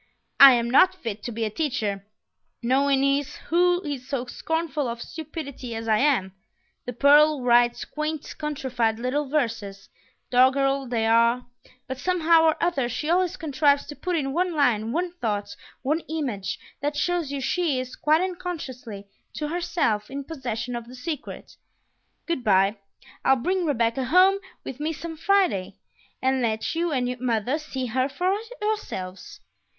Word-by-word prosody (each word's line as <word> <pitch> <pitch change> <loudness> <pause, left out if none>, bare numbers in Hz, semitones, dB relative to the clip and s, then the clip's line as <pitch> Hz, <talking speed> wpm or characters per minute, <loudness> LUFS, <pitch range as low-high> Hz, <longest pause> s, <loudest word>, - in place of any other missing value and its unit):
I 275 -1 +11
am 235 -1 +1
not 365 +10 +5
fit 225 - -6
to 240 - -3
be 225 0 -2
a 215 - -3
teacher; 210 -8 -2 0.6
no 260 +3 +3
one 275 -1 +2
is 280 +1 +1
who 355 +2 +1
is 280 -5 -5
so 260 -3 -2
scornful 310 +1 -2
of 235 0 -4
stupidity 280 -4 -7
as 225 0 -5
I 215 -1 +3
am.... 255 -10 +2 0.5
The 245 - -4
pearl 290 +2 +5
writes 240 0 +3
quaint 305 0 -4
countrified 255 -7 -1
little 260 +4 -2
verses, 225 -9 -2 0.4
doggerel 270 +2 +3
they 230 -2 0
are; 235 +2 +3 0.4
but 260 0 -6
somehow 335 -1 +3
or 320 - +4
other 275 -9 0
she 300 +6 -2
always 360 0 +1
contrives 285 -2 +2
to 295 - -8
put 360 +2 -2
in 270 -4 -1
one 355 +1 0
line, 230 -6 +2
one 345 +4 -1
thought, 205 -3 -2 0.3
one 300 +5 +1
image, 260 -12 -3 0.2
that 290 +1 -2
shows 345 -2 0
you 280 - -3
she 285 +1 0
is, 255 0 -6
quite 310 +2 +2
unconsciously 280 - -5 0.3
to 300 -1 -3
herself, 315 -11 -1
in 275 +1 -5
possession 250 -5 -4
of 235 -1 -6
the 250 - -11
secret.... 295 +2 -7 0.7
Good 335 -7 -2
by; 195 0 +3 0.5
I'll 265 - +5
bring 360 +8 -1
Rebecca 235 -3 0
home 370 +7 +5 0.2
with 265 - -7
me 310 +2 -1
some 325 +1 -7
Friday, 355 - +1 0.5
and 260 0 +2
let 220 -2 -1
you 335 0 -1
and 250 -2 -1
mother 245 +4 0
see 265 -4 -5
her 255 +3 0
for 365 +6 0 0.3
yourselves. 190 - -4
270 Hz, 160 wpm, -25 LUFS, 235-315 Hz, 0.7 s, I